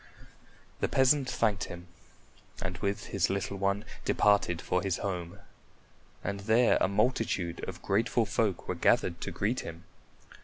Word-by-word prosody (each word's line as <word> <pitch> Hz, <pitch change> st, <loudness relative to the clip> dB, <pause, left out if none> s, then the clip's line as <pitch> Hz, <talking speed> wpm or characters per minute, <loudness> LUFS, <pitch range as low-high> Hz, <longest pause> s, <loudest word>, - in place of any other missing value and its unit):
The -, -, +1 dB
peasant 130 Hz, 0 st, +3 dB
thanked 105 Hz, -6 st, +1 dB
him 85 Hz, 0 st, -9 dB, 0.7 s
and -, -, -4 dB
with 100 Hz, 0 st, -2 dB
his 95 Hz, -3 st, +2 dB
little 100 Hz, 0 st, -2 dB
one 100 Hz, +2 st, 0 dB, 0.2 s
departed 100 Hz, -4 st, +3 dB
for 90 Hz, -, 0 dB
his 95 Hz, -2 st, -1 dB
home, 90 Hz, -4 st, -4 dB, 0.9 s
and 100 Hz, +1 st, -3 dB
there 110 Hz, +4 st, +4 dB
a -, -, +4 dB
multitude 100 Hz, -4 st, 0 dB
of 90 Hz, -1 st, -9 dB
grateful 110 Hz, +3 st, +2 dB
folk 105 Hz, -3 st, -1 dB
were -, -, 0 dB
gathered -, -, +2 dB
to -, -, -3 dB
greet 110 Hz, +5 st, -1 dB
him. 85 Hz, +1 st, -7 dB
100 Hz, 145 wpm, -30 LUFS, 90-110 Hz, 0.9 s, there